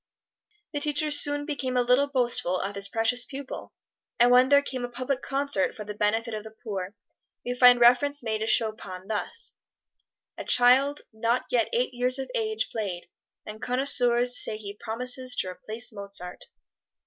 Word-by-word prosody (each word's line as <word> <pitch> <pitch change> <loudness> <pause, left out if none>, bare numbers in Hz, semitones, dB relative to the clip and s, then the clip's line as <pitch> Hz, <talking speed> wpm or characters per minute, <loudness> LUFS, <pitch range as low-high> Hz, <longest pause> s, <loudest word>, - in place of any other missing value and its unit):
The 290 - -1
teacher 295 +1 -1
soon 290 0 +2
became 265 -4 -2
a 245 - +3
little 250 +4 +3
boastful 240 -9 0
of 200 - -3
his 200 0 -2
precocious 225 +4 +1
pupil, 275 0 -8 0.5
and 240 +1 +6
when 250 +1 +6
there 285 0 +5
came 255 -3 -5
a 245 - -3
public 255 +2 -3
concert 280 -1 -1
for 215 - -7
the 210 0 -6
benefit 220 +3 0
of 215 -1 -4
the 220 - -9
poor, 200 -3 -5 0.5
we 245 - -1
find 245 -1 +7
reference 250 +4 +4
made 220 -2 -1
to 220 - -2
Chopin 215 -5 -2
thus, 220 - -3 0.8
"A - - -4
child 260 +4 +4
not 230 +3 0
yet 235 -3 +2
eight 250 +2 0
years 250 +1 0
of 265 -1 -5
age 220 0 -1
played, 195 -6 -4 0.4
and 215 +1 -9
connoisseurs 245 -1 +2
say 215 - -2
he 200 -2 -8
promises 250 +3 -1
to 185 - 0
replace 220 +6 -6
Mozart." 200 -3 -6
245 Hz, 170 wpm, -26 LUFS, 220-260 Hz, 0.8 s, find